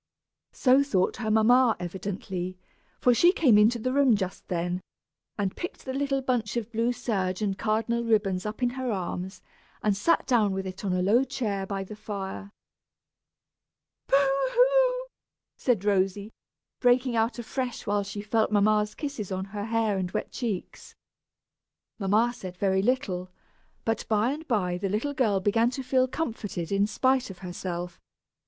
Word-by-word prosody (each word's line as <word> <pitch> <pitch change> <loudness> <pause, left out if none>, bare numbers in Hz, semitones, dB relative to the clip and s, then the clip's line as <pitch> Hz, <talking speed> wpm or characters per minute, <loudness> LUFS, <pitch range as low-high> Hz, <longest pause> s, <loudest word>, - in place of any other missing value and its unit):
So 260 +1 +4
thought 195 -10 +1
her 220 -3 -3
mamma, 230 +2 +5
evidently, 185 0 -5 0.4
for 250 - +4
she 345 +9 +5
came 285 - +4
into 215 +3 +5
the 255 +3 -2
room 275 -4 +5
just 190 -2 -4
then, 175 +1 -2 0.6
and 195 -2 -1
picked 350 - -6
the 260 - -3
little 275 0 0
bunch 240 -4 -1
of 230 -1 -4
blue 230 +1 +1
serge 195 -5 -2
and 195 -2 0
cardinal 225 +3 0
ribbons 205 -5 +1
up 215 +4 -5
in 245 - +2
her 260 -1 -3
arms, 185 -1 -4 0.4
and 210 -2 +2
sat 335 +12 +2
down 220 -6 +2
with 190 0 -3
it 185 +1 -7
in 195 - -1
a 180 0 +1
low 225 +7 +4
chair 210 -7 -3
by 195 -1 -3
the 210 +3 -9
fire. 200 -1 -6 1.6
"Boo - - +3
hoo!" - - +3 0.5
said 225 -6 0
Rosy, 200 +1 +1 0.5
breaking 245 0 +3
out 225 +2 +1
afresh 245 +1 -4
when 205 0 +1
she 200 +1 -6
felt 220 +1 +1
mamma's 210 0 +2
kisses 275 - -5
on 190 0 -2
her 205 -1 -3
hair 220 -3 0
and 180 -1 -2
wet - - -3
cheeks. 220 -8 -5 1.0
Mamma 215 +4 +2
said 185 -5 -8
very 190 0 +2
little, 195 -6 -1 0.6
but 225 -1 -1
by 220 +3 +2
and 310 +3 -6
by 180 -7 0
the 195 0 -1
little 225 +9 -1
girl 220 -8 +2
began 225 +4 +2
to 265 +1 -5
feel 255 0 +2
comforted, 220 - -4
in 200 +1 +2
spite 255 +2 +1
of 190 - -9
herself. 175 -1 -5
215 Hz, 160 wpm, -27 LUFS, 195-250 Hz, 1.6 s, mamma